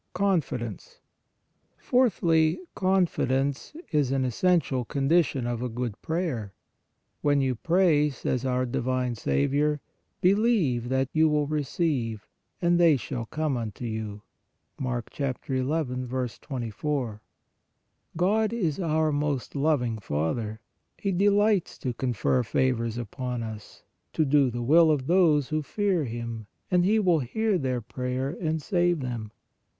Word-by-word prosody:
CONFIDENCE. 155 - -1 0.8
Fourthly, 170 -11 +2
confidence 160 - 0 0.2
is 145 -5 +2
an 135 -1 +1
es 125 -3 -4
sential 165 -9 +2
condition 140 -2 +1
of 120 -1 -2
a 125 - -2
good 120 -2 -4
prayer. 155 - -2 0.7
When 145 -1 +3
you 135 -2 +1
pray, 160 +2 +3
says 130 -2 -2
our 130 -1 0
divine 125 0 -1
Saviour, 140 - +1 0.2
" - - -48
believe 190 - +2
that 130 0 +1
you 160 0 +4
will 150 -1 +2
receive, 140 - -1 0.3
and 175 0 +3
they 165 -4 +6
shall 120 -1 -5
come 155 0 -1
unto 115 0 -5
you" 110 -2 -5 0.6
(Mark 125 -3 -3
ii. 130 -1 -1
24). 125 -3 -3 1.0
God 210 +5 +2
is 175 -10 -1
our 160 -3 +1
most 145 -3 -2
loving 135 -6 +1
Father; 105 +7 -2 0.4
He 200 - -1
de 195 +3 +3
lights 205 -2 +2
to 125 - -3
confer 125 +1 0
favors 115 -1 0
upon 120 +1 -4
us, 110 -2 -9
" - - -50
to 155 - +2
do 140 -1 +4
the 120 0 -4
will 160 +6 +6
of 145 -4 +1
those 160 -5 +3
who 155 0 0
fear 190 0 0
Him, 115 -2 -5 0.2
and 180 -1 +4
He 215 +3 +3
will 180 -6 +3
hear 205 - 0
their 130 -3 -1
prayer, 125 +3 -3
and 160 -1 0
save 175 0 +1
them" 120 -4 -4
(Ps. 110 - -35
135 Hz, 135 wpm, -27 LUFS, 120-165 Hz, 1.0 s, they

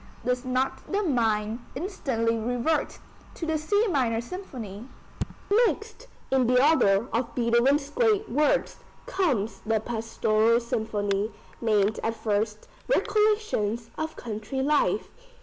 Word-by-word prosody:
Does 250 0 0
not 255 +1 -2
the 405 +1 +1
mind 225 - +1 0.2
instantly 260 - -1
revert 245 +7 -1 0.4
to 330 - -4
the 320 -1 0
C 410 +8 +2
minor 250 - +1
Symphony? 240 - -7 0.8
Next 450 +3 -5 0.2
in 260 -2 +3
the 250 +1 +4
order 220 -9 +4
of 235 +1 -1
Beethoven's 245 +4 +3
great 435 0 +2
works 295 +3 +1 0.3
comes 260 - 0
the 220 0 +1
Pastoral 225 0 +1
Symphony, 210 -3 -1 0.3
named 215 -2 +2
at 225 0 -1
first 215 -1 -2 0.2
"Recollections 420 - +1
of 315 0 -4
country 225 +3 -4
life." 295 +1 +2
240 Hz, 115 wpm, -26 LUFS, 220-310 Hz, 0.8 s, the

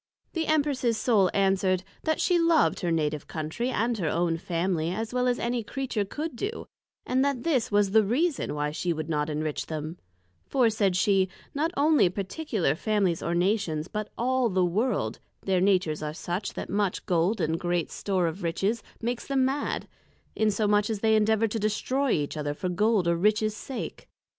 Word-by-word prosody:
The 325 -2 -1
Empress's 280 -7 +1
Soul 210 -6 +3
answered, 190 -2 +2 0.2
That 315 -1 +1
she 355 -2 +3
loved 335 -2 +3
her 175 - -1
Native 150 -3 -1
Countrey, 160 +11 -3
and 235 -1 0
her 165 -4 0
own 170 +1 +1
Family, 170 -1 -1
as 220 +6 -3
well 250 0 +1
as 245 -1 +2
any 240 0 -1
Creature 240 -3 -2
could 300 +7 -5
do; 425 - -4 0.4
and 260 +1 +2
that 275 -4 0
this 260 -9 +1
was 205 -1 +3
the 220 +1 +5
reason 265 - 0
why 150 0 -1
she 170 +3 -1
would 155 0 -5
not 150 -1 0
enrich 155 0 -2
them: 155 +2 -5 0.5
for, 245 -4 +3
said 200 -4 +1
she, 190 0 +3 0.2
not 305 +3 0
only 295 - +4
particular 200 - -1
Families 190 -1 0
or 170 - -1
Nations, 175 -4 0
but 215 +1 -4
all 255 0 +1
the 185 -2 +2
World, 190 - 0 0.2
their 185 -2 +1
Natures 180 -6 +2
are 150 0 -4
such, 180 +4 -3
that - - -4
much 200 -2 -1
Gold, 180 +5 +1
and 160 +1 0
great 175 -1 -1
store 190 -3 0
of 165 +3 -3
Riches, 195 +7 0 0.2
makes 240 +1 -2
them 270 -2 +2
mad; 275 +2 -2 0.5
insomuch 210 -1 +2
as 215 -3 -2
they 220 -1 +4
endeavour 220 +1 +3
to 225 +1 -3
destroy 255 +6 0
each 150 -8 0
other 145 -1 -2
for 185 - -3
Gold 205 0 +2
or 170 - +3
Riches 215 +4 +2
sake. 260 +3 -7
205 Hz, 180 wpm, -27 LUFS, 175-240 Hz, 0.5 s, the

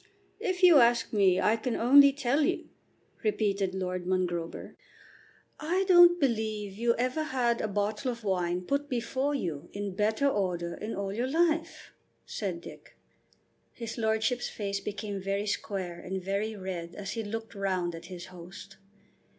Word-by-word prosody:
"If 375 -4 -2
you 345 -5 +9
ask 235 -1 +3
me, 190 -3 +4
I 215 - +3
can 230 +1 -2
only 280 +4 +7
tell 275 +1 0
you," 290 - 0 0.5
repeated 200 -3 0
Lord 185 -1 -3
Mongrober. 175 -3 -2 0.8
"I 355 +5 0
don't 350 -1 +7
believe 220 -6 -1
you 235 +2 +1
ever 255 +5 0
had 250 -6 0
a - - -1
bottle 210 +4 -1
of 235 -1 -9
wine 180 -2 0
put 280 +7 -1
before 260 +4 -1
you 170 - -4
in 200 -1 -4
better 215 +7 +1
order 180 -8 -1
in 215 +2 -5
all 195 0 -3
your 240 +4 -1
life," 330 +1 0 0.3
said 185 -5 -4
Dick. - - -13 0.8
His 230 0 -6
lordship's 220 +2 0
face 200 -2 -3
became 205 0 -5
very 195 +2 -1
square 190 -4 -3
and 190 +1 -4
very 200 +4 -2
red 180 -3 -6
as 195 -1 -5
he 225 - -3
looked 225 +2 -6
round 185 -4 -1
at 165 +1 -9
his 175 0 -8
host. 185 +3 -11
210 Hz, 155 wpm, -29 LUFS, 190-245 Hz, 0.8 s, you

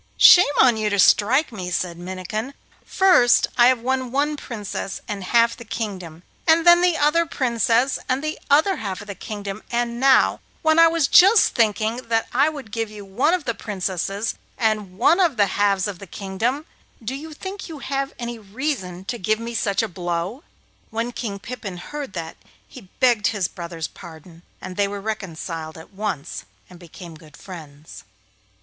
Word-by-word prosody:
'Shame 360 - +8
on 245 -4 +5
you 215 -1 0
to 200 - -1
strike 245 - +4
me!' 185 -5 -6
said 175 -1 -2
Minnikin. 185 +8 -5 0.3
'First 365 - +4
have 250 +1 +5
I 230 - -17
won 260 -1 -1
one 290 +3 0
Princess 210 -7 -6
and 200 -2 -5
half 230 +3 +3
the 235 - -11
kingdom, 185 -7 -6 0.2
and 325 +1 +4
then 345 0 +7
the 355 -2 +3
other 325 +3 +2
Princess 245 -2 +1
and 260 +3 0
the 310 0 -3
other 315 +7 +4
half 195 -3 -5
of 205 - -12
the 200 - -5
kingdom; 205 -1 -7
and 235 0 -2
now, 265 0 +4 0.2
when 315 +1 +4
I 330 - +8
was 325 -3 +1
just 395 +7 +6
thinking 220 0 +1
that 230 -2 -1
I 275 +5 +4
would 280 -8 -9
give 225 0 -3
you 210 -1 -10
one 255 - +1
of 345 -5 -6
the 235 - -1
Princesses 195 +1 -3 0.2
and 215 -5 -1
one 325 - +4
of 335 -9 +2
the 205 - +5
halves 200 0 +1
of 195 -4 -6
the 200 - -10
kingdom, 220 - -3 0.4
do 230 +4 -4
you 305 +4 -7
think 380 +5 -8
you 320 - -7
have 275 0 -3
any 235 -1 -5
reason 200 -5 -4
to 240 +3 -4
give 215 +4 0
me 230 +1 -6
such 200 -2 0
a - - -1
blow?' 175 - -4 0.5
When 230 +2 -3
King 215 -5 -5
Pippin 200 -4 -7
heard 285 +5 -7
that 165 -2 -6 0.3
he 220 -8 -14
begged 240 -5 +3
his 205 -6 -1
brother's 170 -2 -6
pardon, 165 -1 -13 0.2
and 185 0 -8
they 200 -1 +2
were 200 0 -5
reconciled 170 -6 -5
at 160 +4 -14
once 195 -7 -4 0.3
and 180 - -13
became 175 0 -11
good 155 -2 -16
friends. 155 -5 -11
220 Hz, 180 wpm, -22 LUFS, 190-265 Hz, 0.5 s, Shame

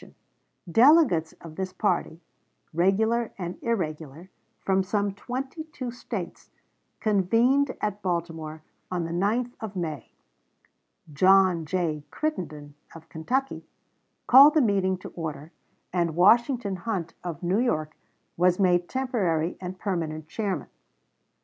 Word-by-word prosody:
1860. 180 +5 +2
Delegates 250 - +4
of 160 -1 -10
this 190 -1 -3
party, 180 -4 -1 0.5
regular 220 +7 +1
and 180 -2 -5
irregular, 165 - -4 0.3
from 190 0 +1
some 200 +1 -1
twenty 265 +9 -5
two 260 -6 -6
States, 245 - -7 0.5
convened 230 +7 +2
at 210 -1 -3
Baltimore 165 -4 -4 0.3
on 180 -2 -2
the 165 - -4
9th 220 +8 0
of 215 -3 -7
May. 160 -5 -4 1.0
John 185 0 +4
J. 160 -4 -1
Crittenden, 155 - -4 0.2
of 165 0 -13
Kentucky, 255 - -2 0.6
called 280 +5 +8
the 310 - +5
meeting 195 -5 +1
to 185 - -9
order, 160 -1 -6 0.4
and 170 -3 0
Washington 225 +2 +3
Hunt, 180 -4 -4
of 175 -2 -6
New 185 +5 +1
York, 155 -11 -1 0.4
was 180 +1 +3
made 175 -2 +2
temporary 190 -11 -1
and 185 0 -6
permanent 160 -6 -3
chairman. 200 +1 -3
185 Hz, 120 wpm, -26 LUFS, 165-225 Hz, 1.0 s, called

